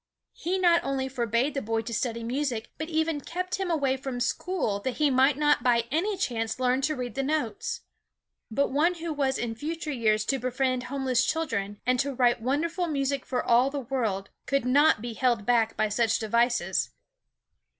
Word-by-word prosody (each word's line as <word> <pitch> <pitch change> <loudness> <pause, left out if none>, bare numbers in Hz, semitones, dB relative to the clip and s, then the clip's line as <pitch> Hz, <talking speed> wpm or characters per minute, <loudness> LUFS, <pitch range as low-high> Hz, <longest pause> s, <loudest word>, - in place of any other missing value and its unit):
He 360 +3 -2
not 345 -2 +4
only 270 -1 -1
forbade 245 +1 0
the 275 - -2
boy 225 +1 -1
to 230 +1 -6
study 230 +1 -2
music, 245 -2 -2
but 315 +1 -4
even 320 -2 0
kept 365 +4 -4
him 380 -2 -1
away 280 -5 +1
from 260 -2 -5
school 255 - -1
that 250 +4 -3
he 300 -2 +2
might 265 +2 +4
not 295 -3 +3
by 235 -1 +3
any 380 +7 0
chance 230 -10 -2
learn 255 +1 +2
to 305 +3 0
read 250 -3 -4
the 270 - -1
notes. 310 - -2 0.7
But 275 +6 0
one 320 +6 +2
who 335 -1 -4
was 275 -2 0
in 235 -1 -2
future 310 +6 -4
years 215 -5 +1
to 270 - 0
befriend 255 0 -1
homeless 260 -1 +1
children 205 -11 -2
and 250 0 +2
to 275 0 -1
write 245 -2 +3
wondrous 295 +9 -1
music 280 -5 -1
for 250 -1 -1
all 245 +3 +4
the 285 0 -3
world 220 -7 -2 0.2
could 275 -2 +1
not 280 -2 +4
be 240 -1 -4
held 240 -3 +1
back 230 -2 +2
by 215 - +2
such 225 +2 +1
devices. 235 +2 +1
260 Hz, 190 wpm, -27 LUFS, 235-295 Hz, 0.7 s, not